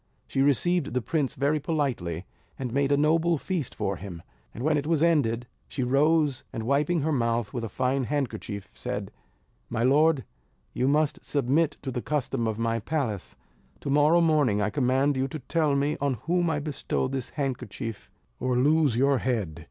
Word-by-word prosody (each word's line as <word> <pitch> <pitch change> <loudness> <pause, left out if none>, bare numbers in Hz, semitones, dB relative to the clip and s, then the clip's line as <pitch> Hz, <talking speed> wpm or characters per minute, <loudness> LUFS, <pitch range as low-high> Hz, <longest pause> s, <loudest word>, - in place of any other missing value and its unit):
She 135 - -1
received 145 +2 +2
the 125 - +2
prince 145 -1 -1
very 145 +3 +1
politely, 125 - -2 0.3
and 125 -3 -4
made 140 +1 +1
a 140 - +4
noble 165 +3 +3
feast 165 -3 -3
for 95 -1 -2
him; 90 -3 -8 0.3
and 120 - -7
when 155 +1 +3
it 145 0 -1
was 165 -1 +2
ended, 125 -8 +2 0.2
she 130 - -3
rose, 145 +1 +2
and 115 - -4
wiping 145 +7 +1
her 160 +3 0
mouth 115 -5 0
with 120 - -3
a 115 - -3
fine 130 +5 0
handkerchief, 110 -7 -3
said: 105 -6 -4 0.6
"My 115 0 -1
lord, 145 +2 +4 0.5
you 130 - 0
must 150 +1 +1
submit 145 +3 +1
to 135 - -3
the 125 - -3
custom 135 -5 -1
of 110 -1 -2
my 115 0 0
palace; 115 - -3 0.5
to 140 - -3
morrow 150 +4 +5
morning 150 -10 +3
I 105 +1 0
command 135 +1 +2
you 130 +1 +1
to 145 - -5
tell 150 +1 0
me 140 +2 +1
on 140 -2 +1
whom 175 +1 +2
I 160 - 0
bestow 145 -3 -2
this 130 -2 -4
handkerchief 125 -5 -4 0.3
or 125 -1 0
lose 145 -2 +3
your 135 +1 +3
head." 105 -11 -2
135 Hz, 180 wpm, -27 LUFS, 120-150 Hz, 0.6 s, morrow